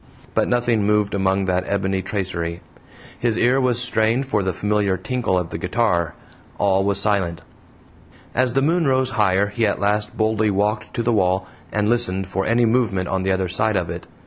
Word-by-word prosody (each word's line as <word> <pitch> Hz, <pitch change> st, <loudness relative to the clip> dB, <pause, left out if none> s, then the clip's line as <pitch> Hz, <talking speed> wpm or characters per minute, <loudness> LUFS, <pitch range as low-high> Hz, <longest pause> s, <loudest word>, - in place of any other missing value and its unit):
But -, -, +1 dB
nothing 120 Hz, -3 st, +1 dB
moved 105 Hz, 0 st, +1 dB
among 95 Hz, 0 st, +1 dB
that 90 Hz, -1 st, 0 dB
ebony 95 Hz, -1 st, -1 dB
tracery; 90 Hz, -4 st, -3 dB, 0.6 s
his 115 Hz, -2 st, +1 dB
ear 125 Hz, +3 st, +3 dB
was 125 Hz, -2 st, +2 dB
strained 120 Hz, +1 st, +2 dB
for 110 Hz, -6 st, 0 dB
the 95 Hz, -1 st, -1 dB
familiar 100 Hz, 0 st, 0 dB
tinkle 120 Hz, 0 st, -1 dB
of 90 Hz, -2 st, -3 dB
the 80 Hz, -, -4 dB
guitar 90 Hz, -4 st, 0 dB, 0.4 s
all 95 Hz, -1 st, +2 dB
was 100 Hz, -1 st, +1 dB
silent. 95 Hz, -5 st, 0 dB, 0.9 s
As 125 Hz, 0 st, +1 dB
the 135 Hz, +1 st, +2 dB
moon 165 Hz, +1 st, +2 dB
rose 130 Hz, -1 st, +2 dB
higher 100 Hz, -3 st, +2 dB
he 115 Hz, +3 st, -2 dB
at 100 Hz, -, -1 dB
last 105 Hz, +1 st, -1 dB
boldly 110 Hz, -1 st, +1 dB
walked 105 Hz, +2 st, -1 dB
to 120 Hz, -, -1 dB
the 120 Hz, +1 st, +1 dB
wall, 95 Hz, -2 st, +1 dB, 0.3 s
and 105 Hz, 0 st, 0 dB
listened 100 Hz, -5 st, 0 dB
for 95 Hz, 0 st, -3 dB
any 120 Hz, +2 st, +3 dB
movement 110 Hz, -6 st, +1 dB
on 95 Hz, -, -1 dB
the 95 Hz, 0 st, 0 dB
other 95 Hz, 0 st, 0 dB
side 105 Hz, +4 st, 0 dB
of 90 Hz, -3 st, -1 dB
it. -, -, -7 dB
105 Hz, 190 wpm, -21 LUFS, 95-115 Hz, 0.9 s, ear